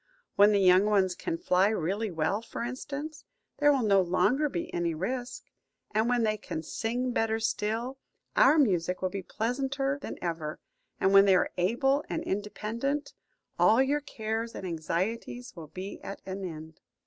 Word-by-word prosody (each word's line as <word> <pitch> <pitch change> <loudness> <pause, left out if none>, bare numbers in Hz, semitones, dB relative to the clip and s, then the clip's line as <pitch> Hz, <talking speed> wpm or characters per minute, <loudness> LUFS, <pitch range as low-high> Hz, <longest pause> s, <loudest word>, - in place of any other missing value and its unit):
When 205 +1 +6
the 205 - +3
young 185 +1 +6
ones 195 -3 +3
can 335 - -3
fly 190 - +3
really 205 +2 -1
well, 170 +5 -1
for 230 - -6
instance, 285 +5 -5 0.4
there 290 0 +6
will 270 -4 +2
no 200 -3 +4
longer 245 - +2
be 175 - -4
any 170 -2 -1
risk; 245 +8 -4 0.5
and 220 +2 +1
when 245 -1 +2
they 215 -1 +1
can 160 -6 -5
sing 245 +8 -2
better 225 -1 0
still, 225 +4 -2 0.4
our 290 +4 +6
music 185 - +1
will 185 - 0
be 195 - -4
pleasanter 270 +7 -2
than - - -6
ever; 160 -3 -4 0.4
and 190 - +3
when 195 0 +8
they 195 -1 +5
are 180 - +2
able 270 +10 +1
and - - -2
independent, 215 +8 -3 0.5
all 225 - +5
your 280 +3 +2
cares 225 -3 -4
and - - -6
anxieties 185 +9 -3
will 165 -3 -9
be 185 +6 -7
at 195 - -7
an 190 0 -5
end. 160 -2 -8
215 Hz, 170 wpm, -29 LUFS, 185-250 Hz, 0.5 s, when